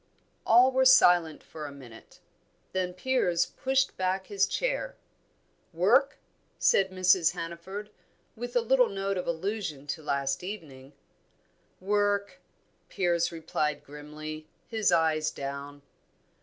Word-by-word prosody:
All 245 +3 +6
were 260 0 +2
silent 175 -11 +5
for 155 -2 -8
a - - -9
minute; 125 -5 -14 0.5
then 185 -1 -1
Piers 180 -4 +1
pushed 270 +6 -1
back 190 +1 -1
his 200 -1 +1
chair. - - -2 0.8
"Work?" 235 - +3 0.4
said 195 -1 +3
Mrs. 185 -2 +3
Hannaford, 190 +5 -7 0.4
with 245 +2 -7
a 245 - +4
little 250 +1 +3
note 195 0 -2
of - - -5
allusion 170 -4 -3
to 150 +3 -4
last 140 0 -2
evening. 150 -9 -9 0.9
"Work!" 205 +1 0 0.5
Piers 175 -2 0
replied 155 -3 -2
grimly, 155 +1 -9 0.2
his 220 -3 0
eyes 160 -2 +2
down. 140 0 -7
180 Hz, 115 wpm, -28 LUFS, 155-210 Hz, 0.9 s, All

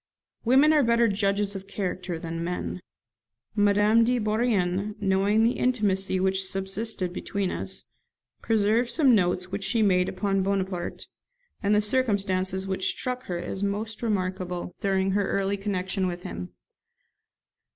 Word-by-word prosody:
Women 270 +6 +5
are 300 - +5
better 235 -2 +3
judges 200 0 0
of 195 0 -7
character 185 -3 -3
than 165 0 -5
men. 180 +1 -4 0.7
Madame 205 +2 +4
de 250 +2 +2
Bourrienne, 210 -3 0
knowing 200 +2 +2
the 230 - +4
intimacy 195 -6 +1
which 190 +1 +1
subsisted 190 0 -2
between 195 0 -2
us, - - -5 0.6
preserved 225 +2 +2
some 275 -4 +4
notes 180 -2 +1
which 200 +1 -3
she 220 +3 +2
made 180 -2 +3
upon 195 +1 0
Bonaparte, 190 -2 -2 0.6
and 205 -1 +2
the 210 - +4
circumstances 195 -5 0
which 190 -1 -1
struck 255 0 -3
her 175 - -3
as 175 +2 -5
most 205 +2 -3
remarkable, 185 -5 -2
during 195 -1 +1
her 200 0 0
early 195 0 0
connection 190 -1 -2
with 175 0 -5
him. 90 +1 -6
195 Hz, 140 wpm, -26 LUFS, 185-215 Hz, 0.7 s, Women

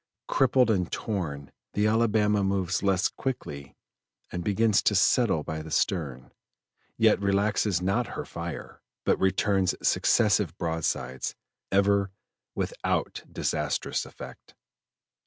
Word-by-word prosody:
Crippled 125 -3 +3
and 90 -5 0
torn 75 -10 -4 0.2
the 105 - +1
Alabama 105 -2 +2
moves 95 -2 0
less 95 -2 +2
quickly 75 - -5 0.6
and 90 0 -4
begins 105 +1 +3
to 105 - +2
settle 100 -4 +3
by 80 +1 -4
the 80 - -9
stern, 70 -7 -1 0.7
yet 110 -2 +4
relaxes 100 -2 +1
not 100 +6 +1
her - - -4
fire, 85 -1 -7 0.2
but - - +2
returns 95 0 +2
successive 105 -6 +2
broadsides, 80 -6 -2 0.4
ever 100 0 +3 0.5
without - - -2
disastrous 75 -2 -1
effect. - - -12
100 Hz, 110 wpm, -27 LUFS, 85-105 Hz, 0.7 s, yet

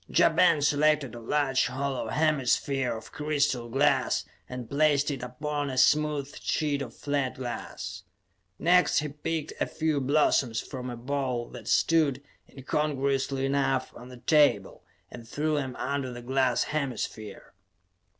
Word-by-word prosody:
Ja - - +5
Ben 165 -2 +4
selected 150 -3 +2
a 120 - -8
large 135 +2 +1
hollow 135 +1 -3
hemisphere 135 -4 +1
of 110 - -12
crystal 140 -5 -1
glass 140 +5 +2 0.2
and 125 -2 -6
placed 145 +1 +2
it 135 - -5
upon 145 +3 -3
a 130 - -5
smooth 150 +1 +2
sheet 145 -3 0
of 120 -4 -7
flat 140 -3 -2
glass. 100 -7 -6 0.6
Next 180 +1 +4
he 150 -1 0
picked 150 +2 -4
a - - +2
few 155 -3 -1
blossoms 135 -4 +2
from 130 -2 -6
a 120 - -6
bowl 130 -1 -2
that - - -10
stood, 150 -5 +2 0.3
incongruously 135 -1 -1
enough, 135 -1 0
on 125 +1 -11
the 125 - -11
table, 145 -8 +2 0.3
and 115 -2 -10
threw 155 +3 -1
them 135 -4 -2
under 140 -1 -2
the 120 0 -8
glass 130 -1 +1
hemisphere. 125 -8 -4
140 Hz, 140 wpm, -28 LUFS, 125-150 Hz, 0.6 s, Ja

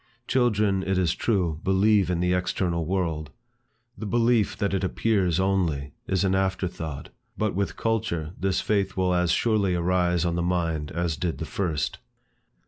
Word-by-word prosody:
Children, 105 -6 +2
it 95 0 -1
is 90 -3 +2
true, 90 -9 0
believe 95 0 +3
in 85 -1 0
the 90 0 +2
external 90 -2 -1
world. 85 -5 -1 0.7
The 110 - -6
belief 115 -3 +2
that 100 -1 -1
it 95 - 0
appears 95 -3 +1
only, 85 -8 0
is 95 0 +1
an 95 -1 +2
afterthought, 90 -6 -2 0.3
but 110 -1 0
with 95 -3 -2
culture, 110 -9 -1
this 95 0 0
faith 100 -3 0
will 90 -1 +2
as 90 -1 +2
surely 100 -1 +2
arise 90 0 +1
on 85 - 0
the 85 - -1
mind 85 -4 -1
as 85 -2 -2
did 85 -1 -2
the - - -4
first. 80 -7 -2
90 Hz, 160 wpm, -26 LUFS, 85-100 Hz, 0.7 s, believe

